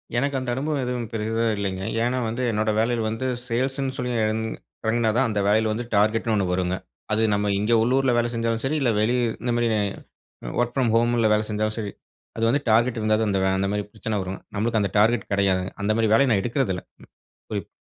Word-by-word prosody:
எனக்கு 140 +3 0
அந்த 130 -1 -4
அனுபவம் 145 +2 -1
எதுவும் 125 -2 -3
பெரிதா 115 +1 -1
இல்லைங்க. 95 -2 -3 0.2
ஏன்னா 125 +2 0
வந்து, 115 +3 -2
என்னோட 110 0 0
வேலையில 115 +1 +1
வந்து 115 +4 -3 0.2
சேல்ஸ்சு 130 +3 -1
ன்னு 135 -1 -3
சொல்லி 125 0 -2
இறங் 110 +1 -1 0.4
இறங்கினா 110 0 +2
தான் 135 0 +3
அந்த 105 -2 -1
வேலையில 110 +1 +3
வந்து 120 +2 -4
டார்கெட்ன்னு 110 +2 +2
ஒண்ணு 100 -2 +1
வருங்க. 90 0 0 0.4
அது 110 +1 +3
நம்ம 105 0 0
இங்க 105 +3 +1
உள்ளூர்ல 130 +2 +2
வேலை 120 0 +1
செஞ்சாலும் 115 0 -1
சரி, 150 +4 0
இல்லை 125 -3 +3
வெளி 115 +3 +2 0.3
இந்த 125 - -1
மாரி 120 0 +2
அ - - +1 0.8
ஒர்க் 120 0 0
ஃப்ரம் 125 -4 +2
ஹோம்ல 115 -1 +3
வேலை 105 0 +1
செஞ்சாலும் 110 0 -1
சரி, 105 -2 -4 0.5
அது 115 - -1
வந்து 140 +4 +2
டார்கெட் 115 +1 +3
இருந்தா 110 0 +2
தான் 110 - +1
அந்த 95 - +1
வே 95 - +3
அந்த 95 0 0
மாரி 105 0 -1
பிரச்சனை 110 0 -3
வரும். 95 +1 -6 0.2
நம்பளுக்கு 110 +2 +1
அந்த 100 - -1
டார்கெட் 110 +1 +2
கெடையாது. 95 -2 +2 0.2
அந்த 105 - +2
மாதிரி 110 -2 +2
வேலையை 135 +4 +4
நான் 100 -3 +3
எடுக்கிறதில்லை. 120 -7 -1 0.7
குறிப் - - -3
115 Hz, 210 wpm, -24 LUFS, 105-120 Hz, 0.8 s, வேலையை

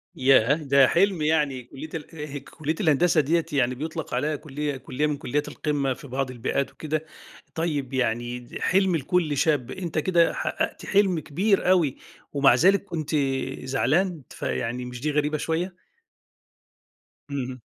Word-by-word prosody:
ياه! 130 0 +5
ده 140 -4 +4
حِلْم 185 -2 +2
يعني، 150 -5 +1
كُلِّية 135 +5 -9
ال 150 -3 -6
كُلِّية 155 0 -4
الهندسة 160 0 +4
ديّة 165 +4 +1
يعني 125 -2 +2
بيُطلق 160 +2 -5
عليها 150 +5 0
كُلِّية 145 -1 -4
كُلِّية 145 +3 -2
من 145 -1 -2
كُلِّيات 145 +3 -2
القمة 140 -3 -1
في 140 - -12
بعض 130 0 -2
البيئات 130 +3 -2
وكده. 155 0 -3 0.5
طيب 145 -5 -2
يعني 120 0 -1
حِلْم 190 -2 +3
لكُلّ 155 0 0
شاب، 145 -6 +1
أنت 170 -4 -5
كده 170 +1 +3
حققت - - -2
حِلْم 195 -4 +3
كبير 185 +6 +1
أوي 165 -8 +3 0.4
ومع 140 -3 +5
ذلك 190 +9 +4
كنت 155 -3 -3 0.5
زعلان، 160 +5 +1
فيعني 115 - -3
مش 125 0 -8
دي 150 0 0
غريبة 150 +1 +1
شوية؟! 170 +4 -2 1.5
اهم. 130 -3 -4
150 Hz, 140 wpm, -25 LUFS, 135-165 Hz, 1.5 s, ياه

